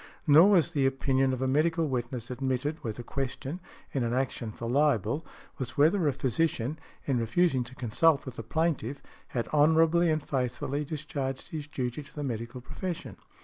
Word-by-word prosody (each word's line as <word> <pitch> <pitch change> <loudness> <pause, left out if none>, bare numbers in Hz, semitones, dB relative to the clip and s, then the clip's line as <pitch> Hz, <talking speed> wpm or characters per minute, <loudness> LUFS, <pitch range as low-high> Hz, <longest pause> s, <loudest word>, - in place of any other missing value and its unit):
Nor 160 +5 +8
was 180 -8 +4
the 135 -2 +2
opinion 135 0 +1
of 130 0 -2
a - - +1
medical 160 +4 +2
witness 120 -2 -3
admitted 130 +4 -1
where 115 - -2
the 120 +3 -7
question, 135 +5 -4 0.3
in 135 - 0
an 120 +1 0
action 130 -3 -2
for 115 +2 -6
libel, 140 - +2 0.4
was 130 +3 -5
whether 160 +4 +4
a - - +4
physician 140 +1 0 0.3
in 130 -4 +1
refusing 130 +4 +2
to 125 +2 -10
consult 140 +6 +2
with 130 - -7
the - - -3
plaintiff 145 0 -1 0.2
had 120 -2 -2
honorably 160 +3 +5
and 155 -1 +1
faithfully 135 +2 -1
discharged 140 -3 -4
his 150 -2 -5
duty 125 -1 -3
to 145 - -16
the 150 - -3
medical 120 0 -4
profession. 175 +6 -5
135 Hz, 175 wpm, -29 LUFS, 125-155 Hz, 0.4 s, Nor